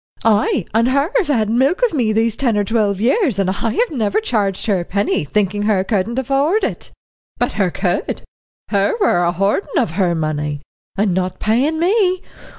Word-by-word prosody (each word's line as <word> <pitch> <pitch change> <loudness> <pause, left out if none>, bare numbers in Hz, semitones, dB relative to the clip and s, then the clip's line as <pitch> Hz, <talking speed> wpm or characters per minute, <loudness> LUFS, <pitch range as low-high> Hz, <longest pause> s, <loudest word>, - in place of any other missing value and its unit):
"Ay 210 -3 +2
and 230 +2 +3
her 280 +6 +1
have 425 - +1
had 230 -7 +1
milk 265 - +1
of 485 - +2
me 240 -7 +1
these 225 0 +1
ten 235 -5 0
or 205 - +2
twelve 205 -2 0
years, 260 - +1
and 190 -2 +1
I've 235 - -1
never 225 - 0
charged 205 - -1
her 200 -4 +1
a - - -3
penny, 200 -1 -1
thinking 205 +5 -1
her 205 -3 +1
couldn't 215 +3 -1
afford 280 - +1
it. - - -4 0.5
But - - -1
her - - +1
could, - - -2 0.5
her 200 - +1
were 285 - +3
a 170 - +2
hoardin' 195 +2 -1
of - - +1
her 175 -1 0
money 150 -2 -3 0.3
and 200 -2 +1
not 185 0 -2
paying 260 +9 +1
me. 370 0 +2
215 Hz, 185 wpm, -18 LUFS, 195-275 Hz, 0.5 s, and